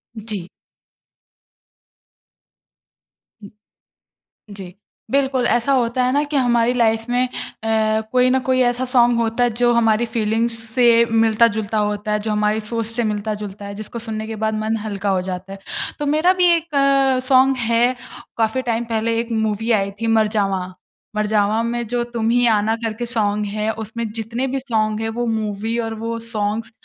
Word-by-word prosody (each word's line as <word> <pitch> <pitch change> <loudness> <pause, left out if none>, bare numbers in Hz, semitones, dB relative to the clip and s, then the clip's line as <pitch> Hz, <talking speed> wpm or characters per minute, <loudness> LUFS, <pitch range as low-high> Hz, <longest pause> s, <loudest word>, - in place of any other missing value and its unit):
जी। 210 -5 -6 3.0
उम, 200 - -9 1.1
जी। 185 -2 -9 0.4
बिल्कुल 270 -2 +1
ऐसा 240 +4 +1
होता 250 -1 +1
है 250 - +2
ना, 290 +1 +2
कि 295 0 -2
हमारी 240 -2 +2
लाइफ़ 225 -2 +1
में 250 +1 +2
अ, 220 -2 -1
कोई 255 0 +4
न 260 +1 +3
कोई 255 0 +2
ऐसा 245 +1 -2
सॉन्ग 240 -2 +4
होता 230 +1 +1
है 245 - +3
जो 240 0 +4
हमारी 230 0 +3
फ़ीलिंग्स 225 +1 0 0.2
से 245 +2 +2 0.3
मिलता-जुलता 225 -1 +2
होता 210 +1 -3
है, 210 - +1
जो 215 +1 -3
हमारी 210 +1 +1
सोच 230 -1 -2
से 230 +2 -2
मिलता-जुलता 210 -1 -5
है, 200 0 -7
जिसको 215 +3 -6
सुनने 220 -1 -5
के 220 - -5
बाद 220 - 0
मन 220 +1 0
हल्का 200 -1 -3
हो - - 0
जाता 185 +1 -6
है। 195 - -10 0.4
तो 295 - -2
मेरा 350 +4 +4
भी 355 - +6
1 330 -2 -5
अ, 275 -1 +3
सॉन्ग 265 0 +4
है। 240 +2 +3 0.4
काफ़ी 225 +3 +1
टाइम 230 +1 -1
पहले 225 +1 0
1 235 0 -4
मूवी 220 +2 -1
आई 195 0 -3
थी, 230 - 0
मरजावा। 205 -4 +1 0.5
मरजावा 210 +1 +1
में 235 0 -2
“जो 240 +2 -1
तुम 225 -1 0
ही 245 +1 +3
आना” 215 +1 +1
करके 225 +2 -3
सॉन्ग 210 -3 0
है, 215 +1 0
उसमें 220 +1 -5
जितने 230 +4 -2
भी - - 0
सॉन्ग 220 -4 -1
हैं, 225 - -2
वो 240 - 0
मूवी 215 +2 -3
और 225 - -4
वो 230 0 -2
सॉन्ग्स, 215 +1 -2
225 Hz, 170 wpm, -20 LUFS, 215-245 Hz, 3.0 s, भी